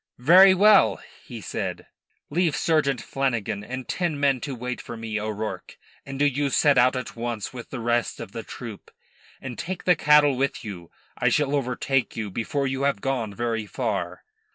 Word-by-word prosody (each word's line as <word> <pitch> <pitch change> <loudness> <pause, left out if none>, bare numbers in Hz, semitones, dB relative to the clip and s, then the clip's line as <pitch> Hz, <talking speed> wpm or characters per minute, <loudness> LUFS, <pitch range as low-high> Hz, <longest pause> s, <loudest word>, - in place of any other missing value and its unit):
"Very 185 +9 +7
well," 210 +2 +5 0.3
he - - -8
said. - - -4 0.5
"Leave 165 -1 +1
Sergeant 145 -6 +1
Flanagan 120 -7 -2
and 130 +3 -6
ten 170 -5 -2
men 140 -3 +2
to 140 -3 -4
wait 125 +1 -5
for 120 - -8
me, 110 -1 -3
O'Rourke, 110 0 -5 0.3
and 135 0 -6
do 145 - +2
you 145 0 +1
set 145 +2 +4
out 125 +1 +4
at 125 -2 -5
once 115 -2 -4
with 125 -2 -9
the 130 - -6
rest 120 0 0
of 115 -4 -7
the 115 - -5
troop. 115 -3 -9 0.5
And 125 -3 -7
take 185 +1 -5
the 180 - +4
cattle 150 -2 +5
with 135 -1 -2
you. 90 -5 -8 0.3
I - - +3
shall 145 -1 +1
overtake 135 -1 -1
you 105 -3 -4
before 135 +7 -2
you 135 0 -2
have 140 -6 +1
gone 125 -3 -2
very 115 -2 -2
far." - - -3
130 Hz, 180 wpm, -25 LUFS, 115-145 Hz, 0.5 s, Very